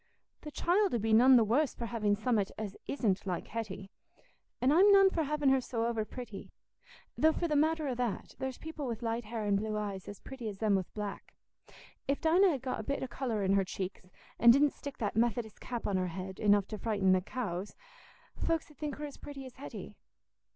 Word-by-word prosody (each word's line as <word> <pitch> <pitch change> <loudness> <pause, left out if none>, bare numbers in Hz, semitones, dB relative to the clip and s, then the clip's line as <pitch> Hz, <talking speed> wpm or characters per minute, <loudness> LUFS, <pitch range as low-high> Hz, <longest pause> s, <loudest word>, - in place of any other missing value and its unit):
"The 300 - -7
child 365 +3 +2
'ull - - +1
be 220 +1 +1
none 255 +4 +8
the 235 - +6
worse 250 +6 +1
for 235 - -4
having 215 -3 +1
summat 215 -2 +1
as 210 -3 -5
isn't 205 -8 0
like 180 -2 -2
Hetty. 205 -3 -5 0.7
An' 255 +2 +3
I'm 380 +6 +6
none 390 -1 +7
for 330 - 0
having 295 -1 +1
her 265 -1 +4
so 230 -2 -2
overpretty. 230 -1 -4 0.7
Though 315 - +4
for 340 - -1
the 305 - 0
matter 310 +1 +2
o' 260 - 0
that, 240 -4 -3
there's 265 -1 -3
people 315 -3 -6
wi' 230 -2 -2
light 230 0 -2
hair 220 0 -4
an' 205 -1 +2
blue 215 +1 -2
eyes 200 -3 -4
as 205 - -8
pretty 255 -5 -6
as 200 - -8
them 215 0 +1
wi' 190 -2 +1
black. 205 -2 -6 0.7
If 275 - 0
Dinah 355 +5 +5
had 275 -6 -2
got 255 -3 -2
a - - -4
bit 280 +4 -2
o' - - -2
colour 235 -4 -2
in 190 0 +2
her 195 0 +4
cheeks, 185 +1 -5 0.4
an' 235 - +7
didn't 280 +4 +6
stick 285 -1 -8
that 205 -3 -2
Methodist 225 -1 0
cap 240 -2 -4
on 195 - +1
her 185 0 0
head, 185 +2 -6
enough 205 -2 +4
to 215 - -5
frighten 200 -4 +2
the 185 0 +4
cows, 200 -3 -4 0.6
folks 325 -2 -1
'ud 300 - -20
think 300 -2 -4
her 300 - -5
as 285 - -9
pretty 275 -2 -8
as 255 - -12
Hetty." 280 - -8
235 Hz, 220 wpm, -32 LUFS, 205-280 Hz, 0.7 s, none